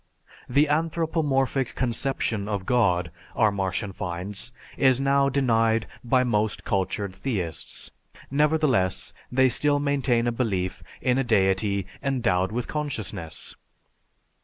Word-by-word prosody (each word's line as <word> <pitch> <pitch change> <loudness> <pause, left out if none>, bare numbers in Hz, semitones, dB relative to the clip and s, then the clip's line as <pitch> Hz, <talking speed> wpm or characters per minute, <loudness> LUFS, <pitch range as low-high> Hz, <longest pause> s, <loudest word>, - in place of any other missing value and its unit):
The 140 +5 +4
anthropomorphic 150 -4 0
conception 115 -4 0
of 100 -3 -2
God, 90 -9 +2 0.2
our 110 -3 +4
Martian 95 +1 -2
finds, 95 +5 -4 0.2
is 130 -2 +4
now 140 0 +3
denied 115 -5 +2 0.2
by 125 +1 +3
most 110 -3 0
cultured 100 0 -1
theists; 95 -8 -4 0.4
nevertheless, 145 -10 +2 0.2
they 130 +1 +4
still 145 +3 +2
maintain 140 -4 +1
a 120 - +2
belief 95 -7 -1 0.2
in 125 0 +2
a - - +2
deity 100 -3 +2 0.2
endowed 115 -9 +1
with 120 +2 -2
consciousness. 110 - -4
120 Hz, 110 wpm, -25 LUFS, 100-135 Hz, 0.4 s, The